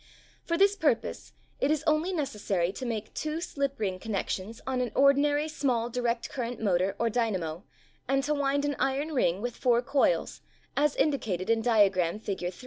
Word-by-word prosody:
For 335 - -1
this 395 +2 +4
purpose 300 - -1 0.3
it 275 - +1
is 310 -1 +1
only 310 +3 +2
necessary 210 - -1
to 255 +5 -6
make 220 -2 -4
two 310 +1 -3
slip 280 -6 -3
ring 190 -4 -2
connections 210 +1 -3
on 260 -1 -1
an 245 -3 -2
ordinary 290 +2 +4
small 250 -6 -1
direct 235 -1 -1
current 245 -2 -4
motor 190 -2 +1
or 235 - +1
dynamp 190 -8 -1 0.5
and 270 +1 +2
to 295 +2 0
wind 285 0 +1
an 290 -1 -1
iron 280 +4 0
ring 195 - +1
with 245 -1 -3
four 245 -2 +2
coils 275 - +1 0.3
as 295 0 +2
indicated 225 - 0
in 225 0 +2
diagram 205 -5 +3
Fig. 190 -4 -3
245 Hz, 170 wpm, -28 LUFS, 210-285 Hz, 0.5 s, this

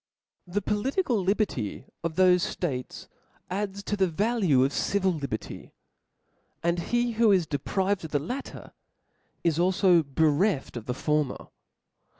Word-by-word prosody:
The 195 +3 -2
political 235 - 0
liberty 185 - -1 0.2
of 165 -1 -2
thofe 185 +2 +3
ftates 130 -8 -4 0.4
adds 200 +1 -3
to 205 - -2
the 190 -2 +2
value 190 - +2
of 135 +2 0
civil 190 -2 +1
liberty; 140 -9 -6 0.9
and 170 +1 +1
he 240 +7 0
who 225 -1 +4
is 185 -4 +3
deprived 185 +6 -1
of - - -6
the 150 - +1
latter, 245 - -6 0.7
is 165 -2 +1
alfo 180 -1 +4
bereft 155 +3 +1
of 115 -3 -7
the 125 - -2
former. 150 -1 -1
180 Hz, 135 wpm, -27 LUFS, 150-205 Hz, 0.9 s, who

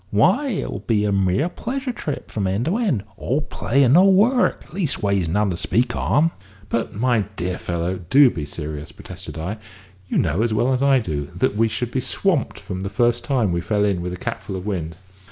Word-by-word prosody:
Why, 185 - +3
it 225 -8 -2
will - - -4
be 105 -3 +1
a 105 - +1
mere 95 - +2
pleasure 255 +8 -4
trip 150 - -5
from 100 -3 -1
end 100 +6 0
to 180 +7 +1
end, 185 - 0
all 135 +5 0
play 125 +1 +1
and 125 0 +4
no 185 +5 +7
work, 220 0 +2
leastways 100 - 0
none 105 +3 +1
to - - -2
speak 115 +7 0
on!" 160 +3 +2 0.4
"But, 115 -2 -2
my 115 -1 +2
dear 90 0 -3
fellow, 85 +2 -2
do 135 -2 +7
be 80 - -5
serious," 75 0 -6
protested - - -9
I. 95 +7 -4 0.5
"You - - -1
know, 85 +5 +1
as 115 -1 +1
well 125 +4 +2
as 130 - 0
I 140 -1 +5
do, 75 - -2
that - - +1
we 115 +2 +3
should 120 +2 -3
be 130 - 0
swamped 165 - -1
the 95 -1 -4
first 120 +3 +1
time 125 -9 +1
we 85 0 0
fell 105 +4 +1
in 95 -4 0
with 90 +1 -3
a - - -5
capful 95 - -5
of 95 0 -6
wind." 85 -6 -3
110 Hz, 210 wpm, -22 LUFS, 90-140 Hz, 0.5 s, no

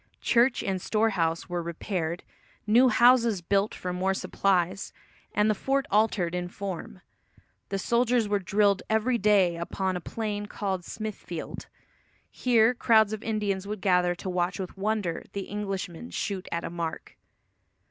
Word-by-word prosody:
Church 240 +1 +3
and 190 -2 -2
storehouse 190 -7 0
were 175 -1 -2
repaired, 170 0 -3 0.4
new 240 +4 +5
houses 235 -6 +4
built 200 +4 +1
for 180 0 -4
more 190 +2 0
supplies, 190 -1 0 0.4
and 210 0 +2
the 215 - +4
fort 270 +6 0
altered 205 -5 +2
in 180 0 -2
form. 185 -1 -6 0.7
The 195 - -1
soldiers 235 +2 +2
were 205 0 +1
drilled 200 +1 +2
every 230 +3 +2
day 190 -4 +3
upon 185 +2 -2
a 180 - -3
plain 210 +1 -4
called 190 -3 -3
Smithfield. 210 -6 -6 0.6
Here 235 -1 +3
crowds 220 -3 +4
of 215 - -4
Indians 205 -3 -2
would 210 0 -4
gather 180 -2 +3
to 180 - -8
watch 180 +1 -1
with 185 -2 -5
wonder 200 -4 -1
the 195 -1 -5
Englishmen 195 0 -4
shoot 195 -3 -3
at 170 0 -2
a - - -5
mark. 170 -2 -5
200 Hz, 145 wpm, -27 LUFS, 180-220 Hz, 0.7 s, new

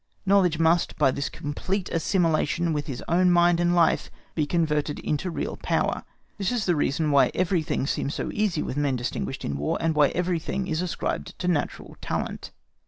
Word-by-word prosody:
Knowledge 190 -4 +4
must, 165 +1 +2
by 130 - +4
this 140 +2 -3
complete 185 +6 -3
assimilation 165 -1 +1
with 150 0 -2
his 135 -4 -5
own 180 +2 +3
mind 175 -1 +4
and 175 0 +2
life, 170 -2 +3 0.2
be 150 -3 0
converted 150 -3 0
into 155 +5 -2
real 170 - -4
power. - - 0 0.4
This 195 +1 0
is 240 -4 -1
the 175 - +2
reason 150 +1 +1
why 140 -1 +5
everything 175 -6 0
seems 140 +1 -2
so - - -3
easy 210 -7 0
with 130 - -4
men 145 -2 +1
distinguished 125 +2 -3
in 70 - -2
War, 75 +2 -1
and 165 -1 +1
why 150 -2 +5
everything 180 +2 -1
is 160 -2 -1
ascribed 180 - -3
to 180 - -3
natural 165 -5 -2
talent. - - -3
165 Hz, 180 wpm, -25 LUFS, 145-180 Hz, 0.4 s, why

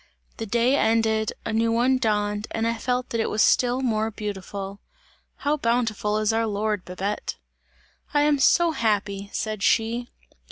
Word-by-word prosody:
The 225 - -5
day 240 +5 +2
ended, 220 -2 +2
a - - -2
new 225 +1 +2
one 250 +3 +2
dawned 210 -2 0
and 225 0 -2
I 230 - +1
felt 250 +1 -1
that 230 - 0
it - - -1
was 215 - +2
still 250 +1 +3
more 220 -3 0
beautiful! 200 -2 -6 0.6
How 295 +1 0
bountiful 230 -4 0
is 215 +1 +1
our 225 0 +1
Lord, 210 -1 -1
Babette!" 190 +3 -3 0.8
"I 290 -1 +3
am 295 -1 +3
so 340 +4 +4
happy!" 205 -6 -1
said 215 -2 -3
she. 230 +4 +1
225 Hz, 160 wpm, -24 LUFS, 210-240 Hz, 0.8 s, so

